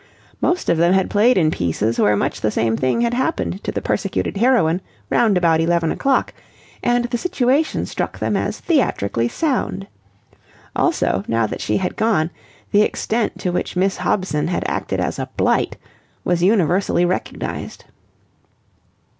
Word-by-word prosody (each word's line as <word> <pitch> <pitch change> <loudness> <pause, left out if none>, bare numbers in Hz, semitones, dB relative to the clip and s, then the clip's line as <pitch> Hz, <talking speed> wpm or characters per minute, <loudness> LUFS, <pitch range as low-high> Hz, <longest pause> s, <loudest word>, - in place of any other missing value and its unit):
Most 355 - 0
of 165 - +2
them 170 +2 +4
had 190 0 +1
played 220 +4 +4
in 155 -4 +3
pieces 105 - -1
where 105 - +4
much - - -2
the 110 - +1
same 110 +1 0
thing 130 - 0
had 235 0 +1
happened 260 +7 -1
to - - -2
the - - -4
persecuted - - -1
heroine 200 -7 +3 0.3
round 215 -5 +3
about 165 -2 +3
eleven 170 -1 +1
o'clock, 275 -1 +1 0.5
and 240 0 +1
the 240 0 -2
situation 280 -1 +1
struck - - -4
them - - -1
as - - -2
theatrically 120 - +1
sound. 255 - -1 0.9
Also, 95 - +1
now 115 0 +1
that 105 - -5
she 105 - 0
had 185 - -2
gone, 200 -7 +1 0.4
the 205 - +5
extent 220 +1 -1
to 180 - -2
which 180 - -3
Miss 190 +2 +1
Hobson 185 -7 0
had 175 - -1
acted - - -2
as - - -2
a - - -4
blight - - +1 0.5
was 175 -1 0
universally 180 -2 +2
recognized. 180 +1 -4
185 Hz, 155 wpm, -20 LUFS, 160-235 Hz, 0.9 s, the